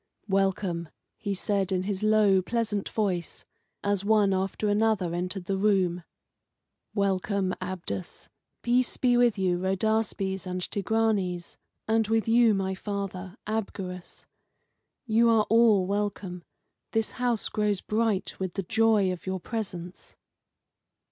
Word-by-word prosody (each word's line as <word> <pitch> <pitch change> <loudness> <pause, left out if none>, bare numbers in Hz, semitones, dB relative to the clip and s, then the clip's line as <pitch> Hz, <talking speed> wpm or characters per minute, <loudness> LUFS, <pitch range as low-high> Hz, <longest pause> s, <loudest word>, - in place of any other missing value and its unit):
"Welcome!" 190 -4 0 0.3
he 200 -3 -2
said, 195 0 0
in 185 -1 0
his 195 0 -3
low, 215 -3 +4
pleasant 215 0 -2
voice, 185 -6 -2 0.4
as 200 -1 +1
one 205 -2 +3
after 190 +3 -1
another 205 -4 +1
entered 180 +1 -3
the 195 +1 -1
room 185 -4 +2 0.9
"welcome, 195 -1 0
Abdus; 175 - -5 0.4
peace 245 +1 +2
be 245 -1 +3
with 240 -3 +4
you, 180 -2 +1
Rhodaspes 195 -1 0
and 180 0 -3
Tigranes, 200 -3 -1 0.3
and 220 -1 +2
with 225 0 +1
you 230 -1 +5
my 190 -1 -1
father, 195 -1 -5
Abgarus. 195 -4 -5 0.8
You 230 0 +4
are 220 -2 +4
all 225 -4 +5
welcome. 195 -3 -3 0.5
This 225 -1 +1
house 240 -3 +1
grows 210 -3 0
bright 215 -3 -1
with 185 -2 -3
the 195 - -2
joy 215 0 +3
of 180 +1 -7
your 190 0 -2
presence." 180 -4 -6
200 Hz, 125 wpm, -27 LUFS, 185-220 Hz, 0.9 s, you